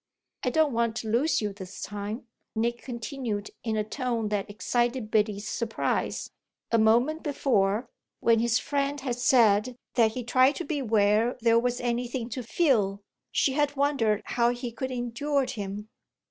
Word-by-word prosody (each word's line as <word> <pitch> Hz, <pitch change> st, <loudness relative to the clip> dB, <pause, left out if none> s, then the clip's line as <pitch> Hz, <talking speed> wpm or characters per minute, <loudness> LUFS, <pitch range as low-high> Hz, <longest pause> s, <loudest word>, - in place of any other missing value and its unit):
"I 250 Hz, -, +2 dB
don't 305 Hz, +1 st, +2 dB
want 230 Hz, -1 st, +1 dB
to 220 Hz, -1 st, -4 dB
lose 260 Hz, +6 st, +2 dB
you 205 Hz, -1 st, -2 dB
this 190 Hz, -1 st, -9 dB
time," 205 Hz, +3 st, -5 dB, 0.3 s
Nick 235 Hz, +2 st, 0 dB
continued 235 Hz, -4 st, -4 dB
in 220 Hz, -2 st, -1 dB
a 215 Hz, -, +1 dB
tone 230 Hz, -1 st, -2 dB
that 205 Hz, -1 st, -2 dB
excited 240 Hz, +2 st, -1 dB
Biddy's 210 Hz, -1 st, +1 dB
surprise. 225 Hz, -1 st, -2 dB, 0.4 s
A 230 Hz, -, +4 dB
moment 240 Hz, +9 st, +3 dB
before, 235 Hz, -6 st, +1 dB, 0.3 s
when 230 Hz, -1 st, +4 dB
his 235 Hz, +1 st, +2 dB
friend 285 Hz, +1 st, -1 dB
had 250 Hz, -3 st, -2 dB
said 240 Hz, -2 st, +4 dB, 0.2 s
that 225 Hz, -3 st, +3 dB
he 250 Hz, -, -4 dB
tried 255 Hz, +4 st, +4 dB
to 345 Hz, -, -4 dB
be 295 Hz, -4 st, -2 dB
where 220 Hz, 0 st, +2 dB
there 230 Hz, 0 st, +5 dB
was 245 Hz, +1 st, -1 dB
anything 240 Hz, 0 st, -2 dB
to 255 Hz, +2 st, -4 dB
feel, 220 Hz, -, +1 dB, 0.3 s
she 270 Hz, -, +2 dB
had 290 Hz, 0 st, +1 dB
wondered 270 Hz, -7 st, +1 dB
how 235 Hz, -1 st, +2 dB
he 245 Hz, 0 st, -3 dB
could 260 Hz, +3 st, -4 dB
endure 255 Hz, +3 st, -1 dB
him. 210 Hz, -3 st, -5 dB
235 Hz, 160 wpm, -27 LUFS, 215-260 Hz, 0.4 s, there